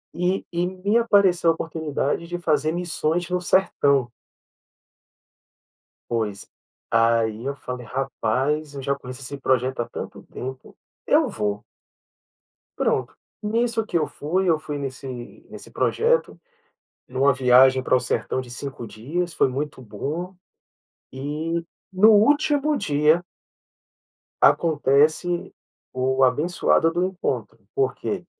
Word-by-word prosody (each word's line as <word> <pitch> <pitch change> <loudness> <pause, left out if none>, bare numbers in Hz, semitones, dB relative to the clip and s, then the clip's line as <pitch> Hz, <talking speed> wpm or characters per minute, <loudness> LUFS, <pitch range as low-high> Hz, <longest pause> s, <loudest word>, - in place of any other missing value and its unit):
E 180 +2 0
e 175 +1 0
me 195 +4 0
apareceu 195 -7 +4
a - - +5
oportunidade 160 0 -2
de 175 0 -4
fazer 155 -2 +1
missões 175 0 -1
no 180 0 0
sertão. 140 -9 +2 2.0
Pois, 110 -4 -2 0.5
aí 115 0 +2
eu 140 0 -2
falei: 125 -2 -7
"Rapaz, 135 +4 -1
eu 140 - -6
já 140 +1 0
conheço 130 -1 -9
esse 140 +2 -6
projeto 130 -1 0
há - - -5
tanto - - -7
tempo, 130 0 -8 0.3
eu - - +4
vou." 105 -1 -2 1.2
Pronto, - - 0 0.3
nisso 225 +1 0
que 175 - 0
eu 155 - 0
fui, 180 +5 -1
eu 160 -2 +3
fui 150 -1 -5
nesse 135 -1 -6 0.4
nesse - - -10
projeto, 475 +2 +1 0.7
numa 135 +2 +3
viagem 130 0 +5
pra - - +3
o - - +3
sertão 125 +2 -1
de 125 - -12
5 120 -1 -6
dias, 160 +11 -4
foi - - +3
muito 140 +1 -4
bom, 150 - -5 0.8
e 155 +5 -3 0.3
no 210 +4 +6
último 290 +6 +3
dia 155 - +2 1.2
acontece 155 +2 +3 0.4
o 130 +1 +1
abençoado 160 +4 +2
do 175 +2 0
encontro, 190 0 -3 0.2
por 410 0 +1
quê? - - -4
150 Hz, 125 wpm, -23 LUFS, 130-175 Hz, 2.0 s, no